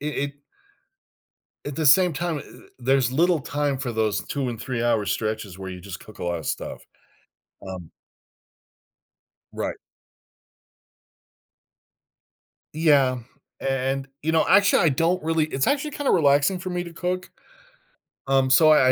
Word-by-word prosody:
it 145 - -5
it 145 -1 -2 1.3
at 145 -2 -5
the 160 - -1
same 180 +4 +6
time, 170 -1 -2 0.4
there's 130 0 +2
little 170 +3 +3
time 145 0 -1
for 130 -3 -4
those 110 -2 0
two 140 -3 -3
and 120 -2 -5
three-hour 120 -4 0
stretches 105 -1 -3
where 95 -1 -6
you 90 -1 -8
just 90 -1 -8
cook 105 -1 -14
a - - -5
lot 85 -1 -1
of 80 - -9
stuff, - - -4 0.8
um 90 -4 -8 1.6
Right. - - -3 3.0
Yeah. 145 -5 +3 0.4
A - - -1
and, 135 +1 -1
you 160 +2 0
know, 160 - +3
actually, 200 0 +5
I - - +6
don't 165 +6 +1
really 160 0 +1
it's 135 -3 -1
actually 290 +1 0
kinda 290 -2 -1
relaxing 145 +3 +3
for 185 +1 -5
me 180 0 -2
to 170 - -9
cook, 185 +1 -3 1.0
um, 135 -1 +3
so 155 +4 +6
I 130 -4 +6
140 Hz, 145 wpm, -24 LUFS, 120-165 Hz, 3.0 s, same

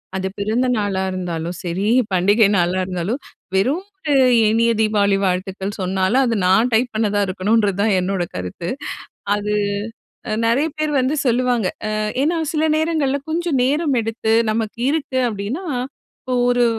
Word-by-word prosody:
அது 190 0 -1
பிறந்தநாளா 215 -2 0
இருந்தாலும் 175 -2 -4
சரி, 185 +3 -2 0.3
பண்டிகை 200 +4 +4
நாளா 180 +1 +1
இருந்தாலும், 185 +7 -3 0.4
வெறும் 265 - +1
ஒரு 310 -6 -2 0.4
இனிய 230 +1 +3
தீபாவளி 205 -2 +2
வாழ்த்துக்கள் 190 +2 -2
சொன்னாலும், 190 +7 +1
அது 235 -2 0
நான் 220 +7 +3
டைப் 240 +2 +2
பண்ணதா 210 -2 +1
இருக்கணும்ன்றதுதான் 205 +1 +1
என்னோட 185 0 -1
கருத்து. 90 - -5 0.7
அது 210 0 -2 0.9
நெறைய 265 +7 +2
பேர் 310 -1 0
வந்து 260 +3 0
சொல்லுவாங்க. 245 -3 +1 0.2
அ - - -2 0.3
ஏன்னா 325 +4 +1 0.2
சில 310 0 +1
நேரங்கள்ல 310 -4 0
கொஞ்சம் 335 -3 0
நேரம் 290 +1 +1
எடுத்து, 225 0 -1 0.2
நமக்கு 220 +1 -3
இருக்கு 285 -4 -1
அப்டின்னா, 220 - -4 0.6
இப்போ 255 - -5 0.2
ஒரு 245 0 +3
220 Hz, 130 wpm, -20 LUFS, 190-255 Hz, 0.9 s, பண்டிகை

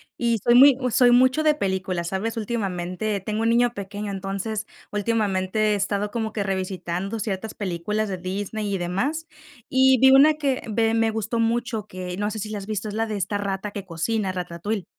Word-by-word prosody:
y 235 -2 +1
soy 240 - +4
muy 270 +1 +8
soy 245 +1 +5
mucho 255 +5 +5
de 305 -1 +3
películas, 185 - -2
¿sabes? 220 +5 -3
Últimamente 200 -2 -2
tengo 215 +3 -3
un 225 - +2
niño 240 +1 +3
pequeño, 200 0 -5
entonces, 200 +3 -4 0.2
últimamente 210 -1 0
he - - +2
estado 200 +1 -1
como 220 -2 -2
que 205 -2 -2
revisitando 190 +1 -3
ciertas 205 0 -4
películas 205 +3 -2
de 190 - -3
Disney 200 +3 -3
y 195 - 0
demás, 195 - -2 0.4
y 260 0 +5
vi 265 +2 +7
una 290 +3 +7
que 280 -4 -1
ve, 225 +1 +1
me 225 0 +2
gustó 220 +1 -2
mucho, 230 -2 -1
que 180 -1 -6
no 205 +1 -1
sé 215 - -5
si 215 0 -5
la 210 - -3
has 195 - -9
visto, 215 -1 -3
es 205 - -5
la 225 +1 -1
de 215 - -3
esta 200 +2 -2
rata 200 0 -3
que 200 -1 -6
cocina, 190 +4 -1
Ratatouille. 180 +3 -4
210 Hz, 195 wpm, -24 LUFS, 190-230 Hz, 0.4 s, muy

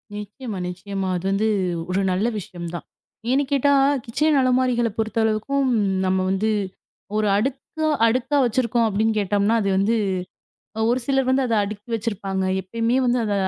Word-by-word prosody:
நிச்சியமா, 210 +2 -6
நிச்சியமா 190 +2 -4
அது 180 +1 -4
வந்து 210 +3 +1 0.4
ஒரு 190 +2 +1
நல்ல 195 +5 +1
விஷயம்தான். 175 -2 -7 0.5
ஏன்னுக் 275 +1 +1
கேட்டா 285 0 +3 0.3
கிச்சன் 300 +5 +2
அலமாரிகளப் 250 -4 +1
பொறுத்த 220 +1 -2
அளவுக்கும் 265 +6 0 0.4
நம்ம 185 0 +2
வந்து 210 +3 0 0.7
ஒரு 215 - +1
அடுக்கா 270 +7 -2 0.2
அடுக்கா 255 +5 +1
வச்சிருக்கோம் 235 -1 +1
அப்டின்னு 215 +1 +1
கேட்டோம்னா 205 +2 +1
அது 200 - 0
வந்து 205 +4 +2 0.8
அ - - -1
ஒரு 250 +2 +1
சிலர் 270 -2 +1
வந்து 265 +1 +3
அத 230 - 0
அடுக்கி 205 +2 -8
வச்சிருப்பாங்க. 200 -4 -2 0.2
எப்பையுமே 230 +5 -1
வந்து 245 0 +2
அத 210 - -1
225 Hz, 145 wpm, -22 LUFS, 200-255 Hz, 0.8 s, கேட்டா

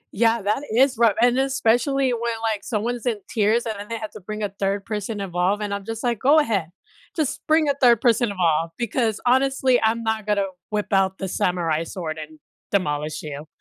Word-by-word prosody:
Yeah, 225 0 +2
that 210 +6 0
is 260 +3 +4
rough, 230 -4 +4
and 245 +1 +4
especially 270 0 +2
when, 235 0 -1
like, 220 -2 -1
someone's 235 +2 -2
in 225 -3 +1
tears, 225 +2 +1
and 220 - -2
then 205 - -7
they 230 - -3
have 215 -1 -6
to - - -10
bring 215 +2 -5
a 205 - -1
3rd 195 0 -1
person 210 0 -4
involved, 195 +2 0
and 205 -1 -3
I'm 200 -1 -5
just 225 +1 -5
like, 235 -3 0
"Go 290 +4 +5
ahead. 205 - 0 0.5
Just 310 -5 -1
bring 310 -1 +3
a 285 - +3
3rd 240 -3 +6
person 235 -1 +3
involved, 165 -3 0
because, 230 -2 -1
honestly, 260 0 +3
I'm 225 +1 +1
not 220 -1 -2
gonna 200 -1 +2 0.2
whip 210 -1 -2
out 190 0 +2
the 190 - -4
samurai 170 -3 0
sword 160 -2 -5
and 155 0 -9 0.3
demolish 150 -6 -1
you." 150 0 -7
215 Hz, 205 wpm, -23 LUFS, 195-240 Hz, 0.5 s, 3rd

